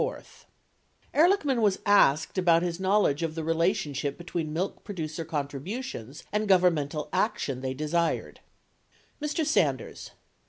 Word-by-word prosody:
Ehrlichman 300 -6 +3
was 205 -3 +3
asked 185 -4 +4
about 170 -2 +4
his 175 0 -2
knowledge 190 -6 +2
of 165 -1 -2
the 165 - -3
relationship 155 -4 0
be 175 - -10
tween 165 -2 -3
milk 175 +5 -3
producer 165 -5 -5
contributions 150 - -5
and 210 +1 0
governmental 165 -6 +2
action 185 - -1
they 130 0 -3
desired: 160 +4 -1 0.8
Mr. 300 +2 -1
Sanders. 310 - 0
170 Hz, 120 wpm, -27 LUFS, 150-205 Hz, 0.8 s, asked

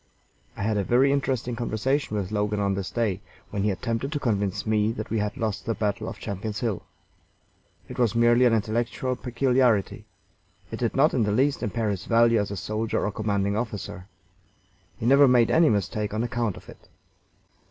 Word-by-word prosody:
I - - -3
had 110 0 0
a 100 - +1
very 130 +7 +3
interesting 130 -3 -1
conversation 120 +1 -1
with 95 -2 -3
Logan 105 0 -1
on 100 -1 +1
this 95 -1 -3
day, 105 -5 -1 0.3
when 100 - -2
he 105 - +1
attempted 115 +7 -2
to 145 - -1
convince 100 -5 -1
me 110 0 +1
that 110 -3 -6
we 110 - +1
had 105 0 -2
lost 110 +1 -3
the 115 - 0
battle 105 -2 -2
of - - -8
Champion's 105 +1 -5
Hill. 115 -6 -1 1.1
It 125 0 -8
was 120 -2 +2
merely 120 +1 +4
an 120 - +4
intellectual 120 +4 -1
peculiarity. 125 -4 +1 0.7
It - - -5
did - - -1
not - - +4
in - - +1
the 105 -1 +1
least 135 +6 +1
impair 110 -1 -1
his 95 -2 -5
value 115 0 +4
as 105 - -1
a 100 - -5
soldier 110 +5 -2
or 105 - -1
commanding 100 -1 -1
officer. 105 -4 -5 0.9
He - - -5
never 140 +3 +6
made 125 -2 +4
any 160 -1 +5
mistake 105 +1 -1
on 110 - 0
account 120 -4 -2
of - - -14
it. - - -15
110 Hz, 190 wpm, -25 LUFS, 105-120 Hz, 1.1 s, never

